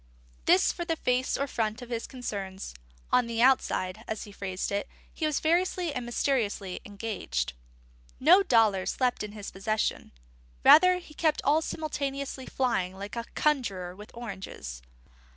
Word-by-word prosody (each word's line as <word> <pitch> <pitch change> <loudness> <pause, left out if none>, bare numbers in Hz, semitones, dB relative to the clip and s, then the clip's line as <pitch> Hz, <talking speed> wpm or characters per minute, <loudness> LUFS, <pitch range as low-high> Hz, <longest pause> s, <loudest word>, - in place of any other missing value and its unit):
This 190 - +5
for 345 - -4
the 335 -1 -1
face 255 -3 0
or 280 - 0
front 225 -3 -2
of 245 - -11
his 230 -1 -3
concerns. 200 -7 -5 0.4
"On 250 -1 +4
the 230 -1 -3
outside," 225 -5 +2
as 220 - -3
he 205 - -10
phrased 195 -1 -4
it, 200 0 -1 0.3
he 315 - -1
was 305 - 0
variously 345 0 +1
and 250 -3 -4
mysteriously 220 -7 -1
engaged. 200 - -3 0.7
No 345 +8 +7
dollar 225 - +3
slept 250 -2 0
in 210 -1 -5
his 205 -2 -7
possession; 215 +3 -1 0.5
rather 365 +3 +8
he 345 -4 -11
kept 310 0 +1
all 300 +3 +4
simultaneously 280 -4 -3
flying 190 -8 0
like 200 +3 -6
a 235 0 -3
conjurer 200 -12 0
with 210 +3 -11
oranges. 190 - -7
235 Hz, 150 wpm, -28 LUFS, 200-280 Hz, 0.7 s, rather